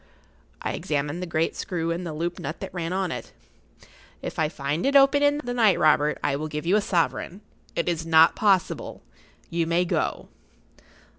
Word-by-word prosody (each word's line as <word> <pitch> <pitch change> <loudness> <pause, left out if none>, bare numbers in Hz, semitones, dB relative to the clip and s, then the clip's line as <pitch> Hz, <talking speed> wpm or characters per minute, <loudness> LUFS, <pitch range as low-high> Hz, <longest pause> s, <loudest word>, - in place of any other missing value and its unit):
I - - -1
examined 150 +3 -2
the 180 - -4
great 165 -1 0
screw 170 -3 -3
and 170 +2 -3
the - - -4
looped 170 +3 -3
nut 155 +4 -5
that 195 - -7
ran 170 -2 -3
on 185 -2 -1
it. - - -7 0.9
"If - - -5
I 155 -1 +2
find 145 +1 -3
it 280 - +1
open 275 +1 +6
in 290 0 +3
the 245 0 -3
night, 225 -6 +4
Robert, 150 -1 +3
I 140 - +1
will 155 +2 -4
give 150 +1 -5
you 180 +4 +3
a 210 - +3
sovereign. 170 +1 -1 0.3
It 170 - -1
is 165 -2 -1
not 160 0 +5
possible. 195 -4 0 0.5
You 170 -1 0
may 170 +2 +2
go." - - -2
170 Hz, 190 wpm, -25 LUFS, 155-190 Hz, 0.9 s, open